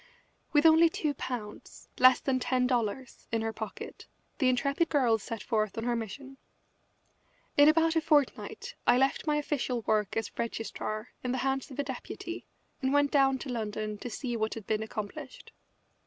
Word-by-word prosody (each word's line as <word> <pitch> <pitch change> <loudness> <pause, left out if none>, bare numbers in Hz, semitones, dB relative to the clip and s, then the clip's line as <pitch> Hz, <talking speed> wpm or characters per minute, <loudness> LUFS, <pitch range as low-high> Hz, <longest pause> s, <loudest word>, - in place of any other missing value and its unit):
With 295 +1 +4
only 325 +1 +7
two 305 -2 -1
pounds, 235 -6 -7
less 255 0 +7
than 260 -2 0
ten 255 0 +1
dollars, 245 0 -2
in 225 -1 0
her 225 0 -2
pocket 220 -1 -7 0.3
the 260 -4 +4
intrepid 280 +6 +1
girl 245 -7 +3
set 225 0 -6
forth 215 -2 -1
on 225 - -2
her 240 0 0
mission. 265 +5 -6 1.2
In 290 +1 +7
about 325 +1 +3
a 325 - +3
fortnight 295 -3 0
I 245 - +6
left 270 +4 +1
my 300 - +3
official 280 -5 -1
work 215 -1 0
as 225 -2 -3
registrar 225 -1 -3
in 250 0 -1
the - - -1
hands 270 0 -1
of 260 - -10
a 285 - 0
deputy 265 -2 -6 0.3
and 265 -1 +1
went 285 0 +3
down 270 -2 +4
to 265 - -7
London 215 -3 -3
to 245 - -5
see 240 +1 -3
what 220 -1 -1
had 220 -3 -8
been 215 +1 0
accomplished. 220 - -7
250 Hz, 175 wpm, -30 LUFS, 225-280 Hz, 1.2 s, only